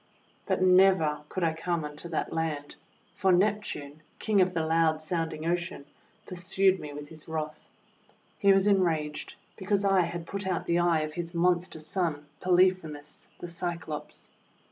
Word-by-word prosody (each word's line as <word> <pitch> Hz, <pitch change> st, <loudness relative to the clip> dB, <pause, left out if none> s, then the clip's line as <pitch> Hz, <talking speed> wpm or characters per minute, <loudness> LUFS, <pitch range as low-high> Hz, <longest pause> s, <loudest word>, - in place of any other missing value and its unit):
But 190 Hz, -1 st, +1 dB
never 180 Hz, -5 st, +4 dB
could 185 Hz, -, -3 dB
I 165 Hz, -1 st, +2 dB
come 165 Hz, -1 st, -2 dB
unto 150 Hz, +3 st, -7 dB
that 160 Hz, -, -2 dB
land, 155 Hz, -3 st, -3 dB, 0.4 s
for 190 Hz, -1 st, +2 dB
Neptune, 180 Hz, -6 st, 0 dB, 0.2 s
King 210 Hz, -3 st, +2 dB
of 185 Hz, -1 st, +1 dB
the 160 Hz, -1 st, +1 dB
loud 160 Hz, -1 st, +2 dB
sound 165 Hz, 0 st, -1 dB
ing 155 Hz, 0 st, -6 dB
Ocean, 170 Hz, -3 st, -2 dB, 0.4 s
pursued 185 Hz, +1 st, +2 dB
me 150 Hz, -, -7 dB
with 145 Hz, 0 st, -8 dB
his 155 Hz, -1 st, -11 dB
wrath. 155 Hz, -1 st, -5 dB, 0.7 s
He 200 Hz, -, +5 dB
was 195 Hz, 0 st, +4 dB
enraged 165 Hz, -7 st, +1 dB, 0.2 s
because 200 Hz, +1 st, 0 dB
I 195 Hz, -1 st, +4 dB
had 170 Hz, 0 st, -3 dB
put 195 Hz, +2 st, -4 dB
out 185 Hz, -2 st, -1 dB
the 170 Hz, 0 st, +2 dB
eye 170 Hz, -2 st, +3 dB
of 155 Hz, 0 st, -4 dB
his 170 Hz, +1 st, -5 dB
monster 175 Hz, 0 st, +1 dB
son, 155 Hz, -2 st, -2 dB
Polyphemus 180 Hz, -5 st, +1 dB
the 175 Hz, -, -7 dB
Cyclops. 170 Hz, -3 st, -5 dB
170 Hz, 160 wpm, -28 LUFS, 155-185 Hz, 0.7 s, He